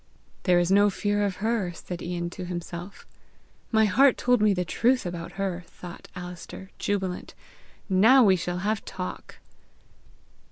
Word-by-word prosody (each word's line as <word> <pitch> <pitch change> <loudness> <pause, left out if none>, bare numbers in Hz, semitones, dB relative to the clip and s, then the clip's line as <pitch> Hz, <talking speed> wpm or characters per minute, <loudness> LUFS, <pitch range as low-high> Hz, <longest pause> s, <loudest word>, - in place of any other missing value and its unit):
"There 180 - +6
is 175 +1 +2
no 205 +1 +6
fear 205 +1 -1
of 200 -2 -1
her!" 215 -6 0
said 175 +1 -7
Ian 175 0 -3
to 185 - -7
himself. 175 +1 -7 0.7
"My 220 -1 +4
heart 260 +6 +4
told 245 -2 +2
me 210 -1 +5
the 180 -2 0
truth 250 +7 +2
about 175 -1 -5
her!" 190 -3 -3
thought 175 -1 -11
Alister 180 +1 -8
jubilant. 190 -3 -2 0.5
"Now 225 +8 +6
we 195 -4 +5
shall 175 0 -3
have 215 0 0
talk!" 185 0 -7
190 Hz, 150 wpm, -26 LUFS, 175-210 Hz, 0.7 s, There